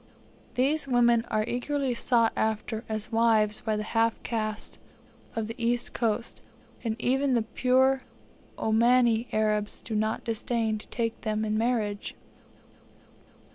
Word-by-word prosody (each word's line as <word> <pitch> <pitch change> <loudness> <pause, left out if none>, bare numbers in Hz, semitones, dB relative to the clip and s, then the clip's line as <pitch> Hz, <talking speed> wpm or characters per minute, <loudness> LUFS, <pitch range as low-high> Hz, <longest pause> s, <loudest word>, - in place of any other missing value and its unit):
These 280 +3 +2
women 240 -2 +3
are 215 0 +1
eagerly 265 +2 -1
sought 230 -1 +2
after 220 +1 -1
as 215 0 -3
wives 225 -2 +3
by 220 -1 -1
the 210 - -2
half 225 +1 +1
castes 215 -2 -3 0.6
of 225 -1 -1
the 225 - -5
East 240 +1 0
Coast, 230 0 -1 0.4
and 225 -2 -1
even 265 +3 +1
the 230 - +2
pure 260 +3 +2 0.6
Omani 235 +1 +3
Arabs 215 -1 0
do 225 - -7
not 215 +1 0
disdain 225 -1 -1
to - - -10
take 230 -1 -3
them 215 0 -1
in 215 0 -1
marriage. 220 -3 -1
230 Hz, 135 wpm, -27 LUFS, 215-245 Hz, 0.6 s, women